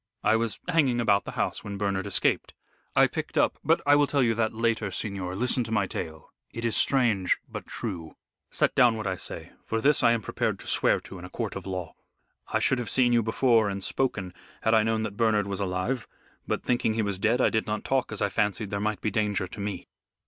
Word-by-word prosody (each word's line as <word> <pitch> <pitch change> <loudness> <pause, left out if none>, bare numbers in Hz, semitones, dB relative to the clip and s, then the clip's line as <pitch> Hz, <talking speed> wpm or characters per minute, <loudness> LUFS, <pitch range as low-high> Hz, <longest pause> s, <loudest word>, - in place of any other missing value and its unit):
I - - +4
was 115 -3 -1
hanging 145 -9 +2
about 100 -4 +2
the - - -6
house - - -1
when 100 -1 -5
Bernard 100 -1 -1
escaped. 100 - +1 0.4
I - - +7
picked - - -4
up - - +2
but - - +3
I 145 - +6
will 145 0 +4
tell 140 -1 +2
you 115 -2 +3
that 110 -1 0
later, 115 -2 0
signor, 95 -2 -4
listen 125 +3 +1
to 110 - -6
my 105 -3 +2
tale 80 -3 -7 0.2
it 115 0 -5
is 115 -3 +1
strange 115 -10 +3
but - - -8
true. 85 -8 -5 0.3
Set - - +1
down 120 -3 +4
what 110 - -5
I 95 -1 -1
say, - - -8
for 115 - -2
this 145 +5 +3
I 115 -1 +5
am 115 -2 -2
prepared - - -1
to - - -11
swear - - +3
to 95 - -10
in - - -10
a - - -9
court 110 +2 -4
of 95 -1 -6
law. 90 -3 -4 0.5
I - - 0
should 135 - +2
have 120 - -4
seen 125 -2 +3
you 120 - +4
before 115 -1 +3
and 100 -1 -4
spoken 100 -9 -1 0.3
had 110 - +2
I 110 - +6
known 110 0 0
that 105 -2 -5
Bernard 110 -3 +2
was 100 -1 -4
alive, 95 +6 -2 0.4
but - - -2
thinking 120 -3 +1
he 110 - +1
was 100 -2 -2
dead 115 +5 +2
I - - +3
did 110 -1 0
not 105 0 -2
talk 135 -3 0
as 110 - -2
I 100 - +1
fancied 105 0 -1
there 100 - -1
might 105 -2 -2
be 110 - -1
danger 105 -3 0
to 100 +4 -10
me." 100 -3 -4
110 Hz, 235 wpm, -27 LUFS, 100-115 Hz, 0.5 s, I